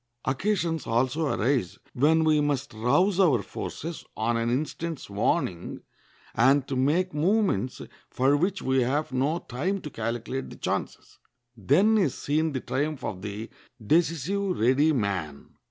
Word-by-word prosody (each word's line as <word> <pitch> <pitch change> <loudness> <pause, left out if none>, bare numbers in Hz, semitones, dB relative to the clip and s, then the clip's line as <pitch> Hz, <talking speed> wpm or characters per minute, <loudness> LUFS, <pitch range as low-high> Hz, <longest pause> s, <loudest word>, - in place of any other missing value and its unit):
Occasions 165 +1 -1
also 130 +7 +1
arise 120 -5 0 0.2
when 160 +5 +3
we 155 -1 +3
must 140 -3 -1
rouse 175 - +2
our 145 - +4
forces 165 - -6
on 115 +2 0
an 115 0 0
instant's 155 +1 -3
warning, 95 -3 -1 0.5
and 135 +3 +3
to - - -3
make 160 +8 +1
movements 160 - +1 0.3
for 135 +3 +2
which 185 +6 0
we 130 0 +2
have 140 +5 0
no 135 +6 +1
time 175 +8 -3
to 150 - -7
calculate 115 +3 -4
the - - -10
chances. - - -4 0.4
Then 195 - +3
is 150 -10 +1
seen 155 +1 0
the 130 - -2
triumph 145 0 -2
of 95 -2 -4
the 105 +2 -6 0.3
decisive, 170 - 0
ready 130 +7 +4
man. 95 - -3
140 Hz, 140 wpm, -26 LUFS, 120-165 Hz, 0.5 s, our